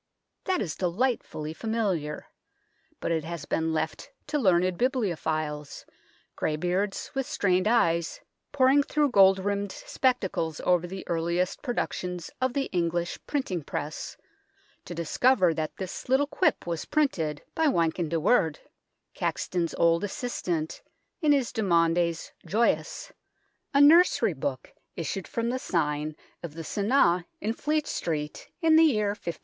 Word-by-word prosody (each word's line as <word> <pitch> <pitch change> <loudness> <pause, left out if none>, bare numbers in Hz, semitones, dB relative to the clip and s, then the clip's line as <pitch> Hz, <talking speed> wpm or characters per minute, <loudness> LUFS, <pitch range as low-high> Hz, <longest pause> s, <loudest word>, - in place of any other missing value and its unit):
" - - -55
That 370 -1 +1
is 165 -5 -4
delightfully 180 -5 -1
familiar; 190 -7 -2 0.7
but - - -2
it 160 -2 0
has 165 -2 -6
been 160 +1 0
left 160 0 -3 0.2
to 295 0 -1
learned 185 -5 +3
bibliophiles, 160 - -2 0.5
greybeards 180 +6 -1
with 270 -2 -2
strained 185 0 +1
eyes 170 -8 +2 0.3
poring 275 0 +5
through 290 -1 +1
gold 195 -3 +6
rimmed 200 +1 -2
spectacles 190 - -1
over 180 -1 +2
the 190 +1 -7
earliest 170 +2 -1
productions 180 - -3
of 260 -1 +1
the 275 - +1
English 175 -1 -1
printing 230 - -1
press, 150 +2 -5 0.7
to 175 - -7
discover 180 - +3
that 155 -1 -4
this 190 +5 -6
little 265 +2 +4
quip 330 +5 +1
was 170 -2 -3
printed 165 - 0
by 320 -1 +2
Wynkyn 170 - +1
de 165 0 0
Worde, 165 -4 +3 0.6
Caxton's 170 -2 -2
old 170 +1 +3
assistant, 180 -7 -3 0.4
in 305 -2 +4
his 275 -4 +2
Demaundes 170 -5 +1 0.2
Joyous, 235 - 0 0.6
a 280 - +3
nursery 290 - +6
book 135 -2 -4 0.2
issued 175 +3 -4
from 230 0 -2
the 255 +1 -1
sign 150 -6 -1 0.3
of 165 -3 -7
the 165 - -6
Sunne 200 - +2
in 215 +2 -1
Fleet 300 +4 0
Street 150 -3 -4
in 320 -1 +6
the 325 - +7
year 215 -9 +2
1510. 170 -5 -5
180 Hz, 135 wpm, -27 LUFS, 165-245 Hz, 0.7 s, the